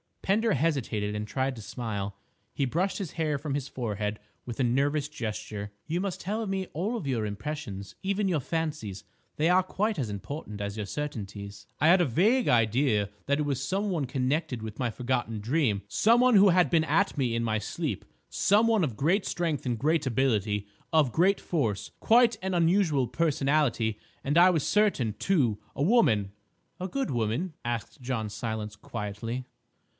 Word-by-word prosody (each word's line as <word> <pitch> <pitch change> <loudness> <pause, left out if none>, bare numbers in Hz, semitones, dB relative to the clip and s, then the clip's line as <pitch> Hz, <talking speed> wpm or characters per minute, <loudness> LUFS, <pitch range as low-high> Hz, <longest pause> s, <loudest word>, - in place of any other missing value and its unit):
Pender 215 +2 +2
hesitated 125 -9 0
and 105 0 -3
tried 130 +5 -1
to - - -7
smile. 100 -3 -4 0.4
He 140 - -1
brushed 180 - -1
his 190 -6 -4
hair 155 -3 0
from 145 0 -4
his 140 -1 -2
forehead 105 -5 -3 0.3
with 120 -2 -6
a - - +3
nervous 140 +4 +1
gesture. 105 -5 -5
"You 165 +2 -1
must 190 -1 -3
tell 215 +4 -2
me 190 -1 -2
all 205 +4 -3
your 120 -5 0
impressions, 105 -2 -5
even 200 +1 0
your 165 -4 +1
fancies; 145 - -3 0.3
they 155 +3 +2
are 185 +1 +5
quite 205 +1 -1
as 120 -5 -1
important 105 - -6
as 100 +1 -4
your 105 - -2
certainties." 100 -6 -6
"I 155 - +6
had 180 +1 +6
a - - +4
vague 210 - +3
idea 115 -2 +3 0.2
that 140 +1 +1
it 150 - 0
was 140 -3 -1
some 195 +8 -1
one 165 -7 0
connected 130 -1 -1
with 110 -1 -7
my 125 -2 +1
forgotten 120 -2 -2
dream, 115 -4 +1
some 230 - +4
one 250 -2 +5
who 200 0 +7
had 180 0 +4
been 160 -2 +3
at 200 +4 +2
me 125 -4 +1
in 115 - 0
my 110 -2 0
sleep, - - -3 0.2
some 210 +3 +3
one 220 -4 +3
of 120 -7 -5
great 180 +8 +2
strength 165 -6 -1
and 120 -2 0
great 155 +4 +1
ability—of 110 - 0
great 185 - +3
force—quite 220 - +2
an 190 0 -2
unusual 170 -5 +3
personality—and, 140 -2 0
I 180 +2 +8
was 165 -6 +1
certain, 195 - +2
too—a 140 - 0
woman." 115 - +3 0.5
"A 185 - -3
good 270 +5 -2
woman?" 120 - -1
asked 120 +4 -4
John 120 -4 -2
Silence 110 -1 -4
quietly. 115 +4 -5
140 Hz, 170 wpm, -28 LUFS, 110-175 Hz, 0.5 s, I